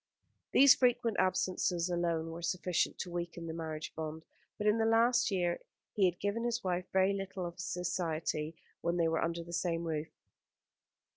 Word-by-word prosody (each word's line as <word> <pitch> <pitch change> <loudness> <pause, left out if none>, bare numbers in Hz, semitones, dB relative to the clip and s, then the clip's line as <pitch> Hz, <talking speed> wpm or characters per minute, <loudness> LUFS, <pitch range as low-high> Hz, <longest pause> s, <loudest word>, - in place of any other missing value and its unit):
These 275 0 +8
frequent 240 -3 +2
absences 185 -2 +1
alone 170 -2 -1
were 165 +1 -7
sufficient 180 0 0
to 180 - -5
weaken 170 -1 -4
the 160 - -4
marriage 160 -1 -5
bond; 160 0 -5 0.3
but 210 - -3
in 210 +2 +4
the 225 - +3
last 235 +3 +4
year 175 -3 0 0.3
he 200 - +3
had 175 -1 +1
given 205 +3 -1
his 240 0 -1
wife 180 -1 -1
very 190 +1 +3
little 195 -1 -4
of 170 - -5
his 180 - -5
society 165 -3 -2 0.3
when 170 +1 0
they 165 -1 +3
were 160 0 +1
under 170 0 -2
the 170 +1 -10
same 170 -1 0
roof. 160 -2 -2
175 Hz, 175 wpm, -33 LUFS, 165-195 Hz, 0.3 s, These